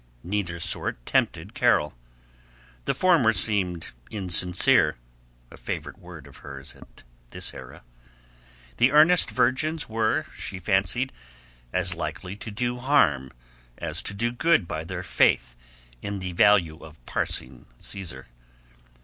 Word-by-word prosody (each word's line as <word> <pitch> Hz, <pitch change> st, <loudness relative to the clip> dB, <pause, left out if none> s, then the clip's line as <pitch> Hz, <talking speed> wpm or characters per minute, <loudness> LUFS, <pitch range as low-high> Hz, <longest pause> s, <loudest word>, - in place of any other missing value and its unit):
Neither 90 Hz, -3 st, -3 dB
sort 80 Hz, -7 st, -1 dB
tempted -, -, 0 dB
Carol. 75 Hz, -, +2 dB, 0.9 s
The -, -, 0 dB
former 165 Hz, -12 st, +4 dB
seemed 95 Hz, -7 st, +3 dB, 0.2 s
insincere 90 Hz, -3 st, +3 dB, 0.6 s
(a -, -, -13 dB
favorite -, -, -6 dB
word 85 Hz, -5 st, -12 dB
of 70 Hz, -, -15 dB
hers 70 Hz, -1 st, -9 dB
at -, -, -16 dB, 0.3 s
this -, -, -3 dB
era). 65 Hz, -1 st, -11 dB, 0.9 s
The 120 Hz, +2 st, +4 dB
earnest 160 Hz, +4 st, +6 dB
virgins 130 Hz, +6 st, 0 dB
were, 110 Hz, 0 st, 0 dB
she -, -, -6 dB
fancied, 95 Hz, +7 st, 0 dB, 0.6 s
as 90 Hz, 0 st, 0 dB
likely 85 Hz, +3 st, -5 dB
to 110 Hz, -, -8 dB
do 120 Hz, +3 st, -2 dB
harm 95 Hz, -, +2 dB, 0.5 s
as 80 Hz, +1 st, -3 dB
to 100 Hz, -, -5 dB
do 120 Hz, +4 st, -1 dB
good 160 Hz, -, +2 dB
by 80 Hz, 0 st, -4 dB
their -, -, -5 dB
faith -, -, +2 dB, 0.5 s
in 100 Hz, 0 st, -4 dB
the 90 Hz, -1 st, -5 dB
value 85 Hz, -4 st, +4 dB
of 80 Hz, -1 st, -13 dB
parsing 65 Hz, -1 st, -2 dB
Caesar. 80 Hz, -10 st, -5 dB
95 Hz, 125 wpm, -25 LUFS, 80-120 Hz, 0.9 s, earnest